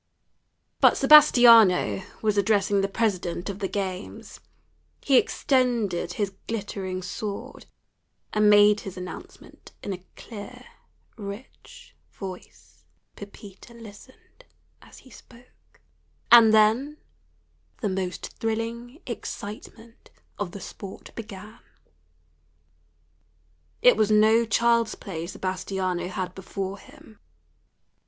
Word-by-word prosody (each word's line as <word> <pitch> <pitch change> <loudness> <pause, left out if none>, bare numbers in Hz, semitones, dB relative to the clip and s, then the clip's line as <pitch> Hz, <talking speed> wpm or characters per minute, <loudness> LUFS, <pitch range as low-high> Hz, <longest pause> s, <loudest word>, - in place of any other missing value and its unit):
But - - +5
Sebastiano 235 -11 +6 0.2
was 215 -1 +1
addressing 200 -1 +2
the 195 - 0
president 195 -3 -2
of 195 - -10
the 195 - -2
games. 190 -1 -6 0.6
He 275 - +2
extended 235 -12 0
his 200 -2 -3
glittering 195 -4 -4
sword, 200 +2 -7 0.7
and 210 0 +4
made 210 0 +6
his 190 -1 -9
announcement 180 0 -11
in 200 - -3
a 180 -1 -9
clear, 210 -3 -10 0.5
rich 205 +4 -11 0.2
voice. 190 -2 -11 0.3
Pepita 205 +2 -13
listened 230 - -16 0.4
as - - -17
he 260 - -17
spoke. 245 +1 -20 0.5
And 230 -2 +9
then 225 +8 +3 0.8
the 210 - -1
most 185 -1 -4
thrilling 230 - -4
excitement 225 +2 -9 0.3
of 200 -4 -3
the 200 - -8
sport 195 +1 -10
began. 215 -1 -10 2.2
It - - +7
was 215 -1 +1
no 220 +2 +4
child's 235 +1 +2
play 170 -4 -7
Sebastiano 185 -1 -3
had 185 -1 -5
before 195 +1 -6
him. 215 +1 -17
205 Hz, 100 wpm, -25 LUFS, 190-230 Hz, 2.2 s, And